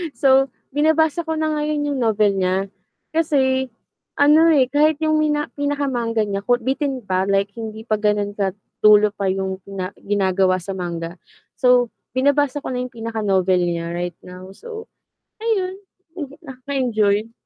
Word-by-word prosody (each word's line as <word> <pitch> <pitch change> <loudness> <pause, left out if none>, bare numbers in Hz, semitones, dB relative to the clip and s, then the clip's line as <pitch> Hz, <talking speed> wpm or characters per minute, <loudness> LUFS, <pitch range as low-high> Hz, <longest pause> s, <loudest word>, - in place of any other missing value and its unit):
So, 270 0 +4 0.2
binabasa 315 +3 +2
ko 320 - -1
na 315 0 0
ngayon 300 0 -1
'yong 275 - -2
novel 215 -3 +3
niya. 190 +1 0 0.4
Kasi 265 -5 +1 0.5
ano, 300 +3 +5
eh, 260 -2 +3
kahit 300 +1 +3
'yong 310 0 +2
mina 295 -1 0
pinaka-manga 265 -6 0
niya 200 -1 -2
ko 245 - +4
bitin 265 0 -2
pa, 190 -1 0
like 200 0 +1
hindi 220 -1 -6
pa 215 -2 -1
gano'n 210 -1 +1
ka 195 -2 -1 0.2
dulo 210 0 +6
pa 200 -1 -3
'yong 190 0 -2
na 185 -1 -4
ginagawa 190 -2 +1
sa 195 - -5
manga. 170 -2 -5 0.4
So, 250 -2 +4 0.2
binabasa 285 +1 +1
ko - - -4
na 250 - -2
'yong 250 +1 -5
pinaka-novel 205 -5 0
niya 170 -1 -3
right 175 +1 -3
now. 180 +1 -11
So 450 - -9 0.6
ayun, 390 -4 -1 0.4
hmm, 285 -3 -6
nakaka-enjoy. 245 -6 -1
235 Hz, 150 wpm, -21 LUFS, 195-285 Hz, 0.6 s, dulo